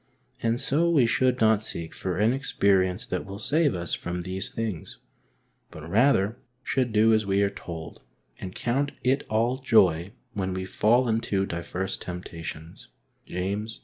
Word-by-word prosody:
And 115 +1 +1
so 160 +6 +2
we 150 -7 +4
should 125 +2 +2
not 110 -1 +4
seek 85 -6 -5
for 90 -2 -3
an 110 +4 +3
experience 100 -6 +1
that - - -3
will 100 0 -8
save 145 - +2
us 85 -2 -4
from 85 0 -3
these 95 +3 -2
things, 110 -8 -4 0.7
but 80 0 -10
rather 110 +1 +3 0.3
should 130 -3 0
do 110 +1 +5
as 110 0 +3
we 100 +1 +3
are 100 - +1
told, 80 -5 -8 0.4
and 90 0 -7
''count 135 +4 0
it 130 +3 +1
ail 120 +4 +1
joy 95 -6 +4 0.2
when 95 -2 -2
we 95 0 -3
fall 120 +6 +3
into 110 -4 0
divers 85 +2 -3
temptations'' 85 -2 -7 0.4
{James 100 +5 -3
i. - - -23
105 Hz, 160 wpm, -26 LUFS, 90-120 Hz, 0.7 s, do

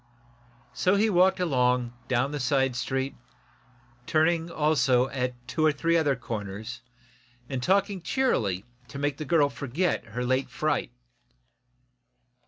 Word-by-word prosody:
So 185 +9 +2
he 215 +2 +2
walked 185 +1 +4
along, 125 -7 +1
down 125 +3 +1
the 150 - -3
side 135 0 +1
street, 130 +2 -2 0.9
turning, 165 +1 +2
also, 135 -6 +2
at 125 -2 -2
two 155 +5 -1
or 155 - +5
three 165 +4 0
other 150 -4 +3
corners, 110 0 -6 0.8
talking 195 +5 +1
cheerily 110 - 0 0.2
to 140 - -9
make 145 0 -1
the 155 - -5
girl 150 -1 +4
forget 140 +5 -2
her 125 +3 -4
late 130 +1 0
fright. 150 -1 -1
140 Hz, 125 wpm, -27 LUFS, 125-165 Hz, 0.9 s, or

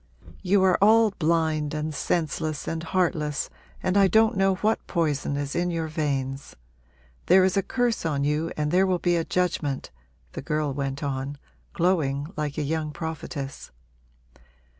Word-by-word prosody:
You 190 +1 +3
are 185 -2 +4
all 220 +1 +6
blind 160 -4 0
and 155 0 -3
senseless 155 -1 -2
and 165 0 -2
heartless 160 -4 -1 0.3
and 185 - 0
I 200 -1 +6
don't 220 +3 +4
know 195 0 +3
what 215 +4 0
poison 150 -5 0
is 145 -1 -3
in 175 +1 +1
your 165 -2 -2
veins. 140 -3 -3 0.7
There 185 +1 +6
is 185 0 +2
a 195 - +3
curse 240 +3 -1
on 145 -4 0
you 150 +3 0
and 150 0 0
there 185 +2 +4
will 185 -1 +2
be 175 0 +1
a 165 - +1
judgment!' 160 -6 -1 0.4
the - - -6
girl 150 -2 -1
went 140 +1 -3
on, 140 0 -3 0.4
glowing 160 -3 0
like 150 -1 -3
a 155 - 0
young 155 +1 -2
prophetess. 150 -3 -6
160 Hz, 160 wpm, -25 LUFS, 145-180 Hz, 0.7 s, all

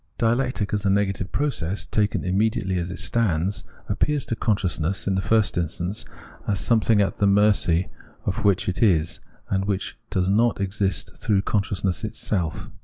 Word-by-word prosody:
Dialectic 120 -2 0
as 105 0 0
a 100 - +2
negative 95 -1 0
process, 110 - -1
taken 105 -1 0
immediately 95 -1 +1
as 85 +1 -3
it 90 - -6
stands, 100 -4 0 0.2
appears 140 +7 0
to 115 - -2
consciousness, 95 -5 0
in 100 - +1
the 95 - +1
first 110 -2 +2
instance, 85 +4 -3 0.4
as 100 -2 0
something 115 -2 +3
at 100 - +1
the 100 - +4
mercy 100 -4 +3 0.4
of - - -1
which 100 -3 +2
it 90 - -2
is, 85 -8 +2 0.3
and 95 0 +1
which 100 -2 -3
does 90 -1 0
not 110 +4 +2
exist 100 0 -1
through 100 -3 +1
consciousness 100 -2 -1
itself. 95 -5 -3
100 Hz, 160 wpm, -24 LUFS, 95-110 Hz, 0.4 s, the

